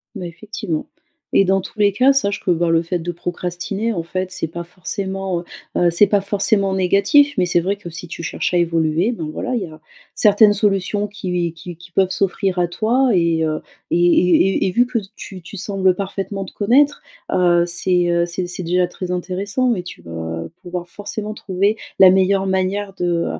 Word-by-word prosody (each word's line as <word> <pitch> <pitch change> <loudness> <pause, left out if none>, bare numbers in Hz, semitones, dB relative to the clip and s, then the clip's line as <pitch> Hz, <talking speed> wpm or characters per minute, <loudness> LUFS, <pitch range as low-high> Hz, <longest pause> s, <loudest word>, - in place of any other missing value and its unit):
Bah, 190 -3 -5
effectivement 175 -1 -5 0.5
et - - +5
dans 195 0 +2
tous 190 - -9
les 205 -1 +4
cas, 255 +7 +4
sache 205 -7 0
que, 180 - +1
bah, 170 0 +1
le 165 0 +3
fait 170 +1 -2
de 175 +2 -3
procrastiner, 180 +5 -3
en 180 -6 -2
fait, 185 +2 -4
c'est 185 -3 -3
pas 170 +2 -6
forcément, 190 +2 -4
heu - - -13 0.3
heu, 175 - +4
c'est 190 +5 +5
pas 200 0 +2
forcément 200 0 +1
négatif. 200 - +4
Mais 180 - +3
c'est 175 0 +2
vrai 190 +4 -1
que, 200 -3 -10
si 175 +1 -7
tu 170 0 -7
cherches 145 - -2
à - - +3
évoluer, 165 +4 +1
ben, 160 -10 -5
voilà, - - -3
il 240 - 0
y - - -3
a 155 -2 -13 0.3
certaines 210 0 +5
solutions 205 0 0
qui 180 -5 -2
qui 175 +1 -9
qui 175 +2 -16
peuvent 190 +1 +2
s'offrir 190 -1 0
à 175 - +2
toi 245 +7 +1
et 170 -3 +2
heu, 155 -1 -1 0.3
et - - +3
et 180 +2 +3
et 185 - 0
vu 245 +6 +3
que 235 -2 -1 0.2
tu 190 -2 -9
tu 190 +4 -10
sembles 190 -1 +1
parfaitement 195 0 -4
te - - -12
connaître, 265 +8 +2 0.3
heu, 175 -1 +3
c'est, 175 0 +1
heu, 170 0 +2
c'est 175 +1 -4
c'est 180 +1 -6
déjà 180 +1 +1
très 180 0 -6
intéressant 200 +7 -1
et 180 - -4
tu 175 - -10
vas 80 0 -5 0.2
pouvoir 175 0 -6
forcément 210 +3 -6
trouver 200 +1 0 0.2
la 190 -1 +9
meilleure 190 +1 +3
manière 190 +1 -1
de, 175 -1 0
185 Hz, 205 wpm, -19 LUFS, 175-200 Hz, 0.5 s, la